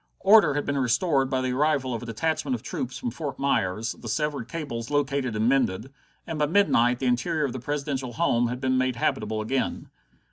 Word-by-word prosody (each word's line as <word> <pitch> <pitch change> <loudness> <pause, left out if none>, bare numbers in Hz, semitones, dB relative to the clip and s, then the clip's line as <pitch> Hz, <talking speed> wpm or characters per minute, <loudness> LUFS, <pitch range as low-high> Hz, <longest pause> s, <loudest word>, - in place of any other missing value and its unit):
Order 195 -7 +6
had 145 - -1
been 140 0 -1
restored 135 +1 +2
by 130 -1 0
the 130 0 -1
arrival 140 -1 +1
of 115 - -4
a 120 - -8
detachment 160 - -1
of - - -8
troops 255 - -4
from 245 -2 -3
Fort 145 -5 -5
Myers, 110 -4 0
the 115 - -7
severed 145 +1 -2
cables 130 -8 -5
located 140 -4 0
and 110 +2 +1
mended, 130 -2 +1 0.3
and 165 -2 -5
by 150 - +2
midnight 125 -10 +3
the 130 - -4
interior 145 +6 +1
of 130 - -3
the 130 - -5
Presidential 140 -1 -3
home 120 +1 +2
had 125 +1 -4
been 130 -1 +1
made 130 -1 0
habitable 110 -2 -1
again. 130 +5 -2
135 Hz, 205 wpm, -26 LUFS, 120-150 Hz, 0.3 s, Order